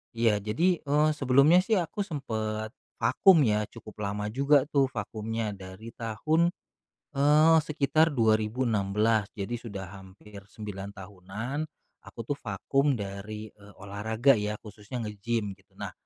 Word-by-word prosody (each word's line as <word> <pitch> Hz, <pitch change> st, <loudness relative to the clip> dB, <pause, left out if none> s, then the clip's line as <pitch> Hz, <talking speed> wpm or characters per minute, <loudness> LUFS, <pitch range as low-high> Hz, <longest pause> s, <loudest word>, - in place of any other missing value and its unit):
Iya, 115 Hz, -3 st, +3 dB
jadi, 165 Hz, -, +1 dB
eee, 150 Hz, +2 st, +4 dB
sebelumnya 140 Hz, +3 st, +5 dB
sih 205 Hz, +4 st, +1 dB
aku 180 Hz, +1 st, -2 dB
sempet 110 Hz, -, -3 dB, 0.2 s
vakum 130 Hz, -, +5 dB
ya 105 Hz, -2 st, +1 dB
cukup 110 Hz, -2 st, -12 dB
lama 105 Hz, +1 st, -3 dB
juga 140 Hz, +2 st, +4 dB
tuh 140 Hz, -2 st, +3 dB
vakumnya 110 Hz, -1 st, -4 dB
dari 95 Hz, +3 st, -10 dB
tahun, 155 Hz, +10 st, 0 dB, 0.6 s
eee, 150 Hz, +3 st, +5 dB
sekitar 155 Hz, +1 st, +2 dB
2016 110 Hz, -2 st, +2 dB
jadi 100 Hz, +1 st, -5 dB
sudah 100 Hz, -5 st, -7 dB
hampir 100 Hz, +2 st, -13 dB
9 100 Hz, -2 st, -8 dB
tahunan 100 Hz, +6 st, -7 dB, 0.5 s
aku -, -, -13 dB
tuh 140 Hz, +5 st, -3 dB
vakum 135 Hz, +7 st, 0 dB
dari, 105 Hz, +1 st, -6 dB
eee, 105 Hz, 0 st, -17 dB
olahraga 110 Hz, +6 st, +2 dB
ya 105 Hz, 0 st, -2 dB
khususnya 110 Hz, +3 st, -7 dB
nge-gym 105 Hz, 0 st, -2 dB
gitu. -, -, -29 dB
Nah -, -, -6 dB
110 Hz, 130 wpm, -28 LUFS, 105-140 Hz, 0.6 s, sebelumnya